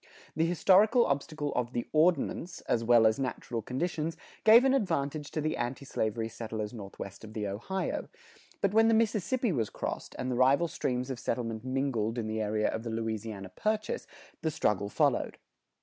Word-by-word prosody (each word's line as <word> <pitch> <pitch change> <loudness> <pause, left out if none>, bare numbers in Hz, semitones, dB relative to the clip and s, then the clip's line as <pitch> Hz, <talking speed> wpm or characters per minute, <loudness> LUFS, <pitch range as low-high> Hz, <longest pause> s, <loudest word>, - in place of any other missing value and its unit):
The 160 +2 +2
historical 200 +7 +5
obstacle 145 +1 -2
of 125 0 -2
the 120 - -1
Ordinance, 165 +2 +1
as 115 - 0
well 115 -1 +6
as 110 +2 +3
natural 125 -2 -3
conditions, 160 +6 -2 0.3
gave 230 +4 +8
an 265 - +4
advantage 155 - -1
to 155 - -3
the 155 +2 -1
anti 125 +3 -3
slavery 110 -3 -1
settlers 110 -1 -5
northwest 100 -2 -8
of 110 0 -10
the 110 -2 -3
Ohio; 115 - -3 0.5
but 200 0 +1
when 225 +1 +5
the 225 - +4
Mississippi 225 +1 +1
was 115 -9 0
crossed, - - -5
and 130 - -2
the - - 0
rival 135 +7 +4
streams 125 -4 -2
of 125 - -5
settlement 115 -2 -3
mingled 130 -4 -1
in 115 - -1
the 110 0 -2
area 105 0 +1
of 110 - -3
the 115 - -5
Louisiana 110 -3 -4
Purchase, 215 - -2 0.3
the 160 - 0
struggle 105 -10 0
followed. - - +1
130 Hz, 175 wpm, -30 LUFS, 110-165 Hz, 0.5 s, gave